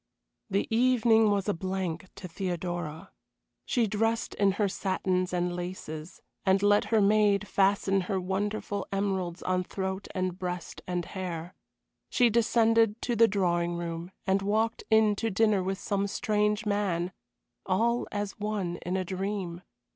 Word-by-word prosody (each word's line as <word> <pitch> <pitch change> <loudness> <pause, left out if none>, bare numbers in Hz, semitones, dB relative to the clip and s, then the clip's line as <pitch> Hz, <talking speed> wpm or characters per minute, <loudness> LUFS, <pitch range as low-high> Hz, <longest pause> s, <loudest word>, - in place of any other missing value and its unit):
The 195 +1 0
evening 230 -3 +4
was 200 -1 0
a 205 - +2
blank 185 -1 -3
to 185 - -7
Theodora. 175 -3 -4 0.6
She 240 - +2
dressed 225 +2 0
in 200 -1 +2
her 205 +1 +1
satins 185 -1 -1
and 175 0 -1
laces, 175 -2 -6 0.2
and 190 +1 +3
let 205 0 +4
her 220 -2 +3
maid 205 0 +3
fasten 195 0 +2
her 195 -2 +1
wonderful 200 +1 -2
emeralds 190 -3 -1
on 185 0 +1
throat 190 +1 -4
and 185 -1 -2
breast 180 -2 -5
and 175 -1 -2
hair. 175 -2 -5 0.6
She 245 -2 +4
descended 225 -1 +3
to 240 - 0
the 230 +1 +6
drawing 175 -4 +1
room 170 0 -4 0.2
and 195 0 +2
walked 220 +3 0
in 220 -1 +5
to 225 - 0
dinner 215 -1 +3
with 190 +1 -2
some 200 0 -1
strange 210 0 0
man 190 -4 0 0.6
all 230 +6 +1
as 205 0 -4
one 205 -5 -2
in 180 +2 -3
a 185 - -2
dream. 185 -2 -3
195 Hz, 145 wpm, -29 LUFS, 180-210 Hz, 0.6 s, the